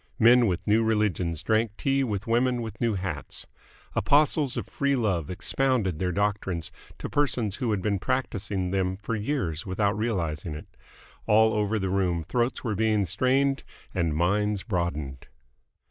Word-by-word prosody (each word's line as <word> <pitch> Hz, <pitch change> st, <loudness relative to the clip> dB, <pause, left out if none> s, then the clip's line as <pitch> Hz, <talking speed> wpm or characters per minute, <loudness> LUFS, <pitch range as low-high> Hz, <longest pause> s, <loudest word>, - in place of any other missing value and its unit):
Men 120 Hz, +1 st, +6 dB
with 90 Hz, -3 st, -2 dB
new 110 Hz, +2 st, +3 dB
religions 100 Hz, -7 st, 0 dB
drank 110 Hz, -1 st, +1 dB
tea 135 Hz, 0 st, +1 dB
with 105 Hz, -5 st, -2 dB
women 120 Hz, +1 st, +1 dB
with 110 Hz, -1 st, -8 dB
new 115 Hz, -3 st, +1 dB
hats. 90 Hz, -5 st, -5 dB, 0.5 s
Apostles 145 Hz, -2 st, +2 dB
of -, -, -2 dB
Free 140 Hz, 0 st, 0 dB
Love 95 Hz, -, 0 dB
expounded 105 Hz, -, 0 dB
their 90 Hz, -1 st, 0 dB
doctrines 95 Hz, -3 st, -1 dB, 0.3 s
to -, -, -5 dB
persons 120 Hz, -8 st, 0 dB
who 125 Hz, -4 st, -1 dB
had 100 Hz, -4 st, -1 dB
been 100 Hz, -1 st, 0 dB
practising 105 Hz, -7 st, -2 dB
them 95 Hz, -1 st, 0 dB
for 105 Hz, +3 st, -3 dB
years 105 Hz, -, -2 dB
without 100 Hz, +2 st, 0 dB
realising 85 Hz, -8 st, -2 dB
it. 75 Hz, -, -11 dB, 0.5 s
All 110 Hz, +1 st, +5 dB
over 105 Hz, +1 st, 0 dB
the 95 Hz, -2 st, -2 dB
room 90 Hz, -4 st, 0 dB
throats 120 Hz, +8 st, -1 dB
were 115 Hz, -4 st, -1 dB
being 105 Hz, -1 st, +2 dB
strained 130 Hz, -, +1 dB, 0.3 s
and 85 Hz, -4 st, 0 dB
minds 100 Hz, +4 st, +1 dB
broadened. 80 Hz, -, -3 dB
105 Hz, 155 wpm, -26 LUFS, 90-120 Hz, 0.5 s, Men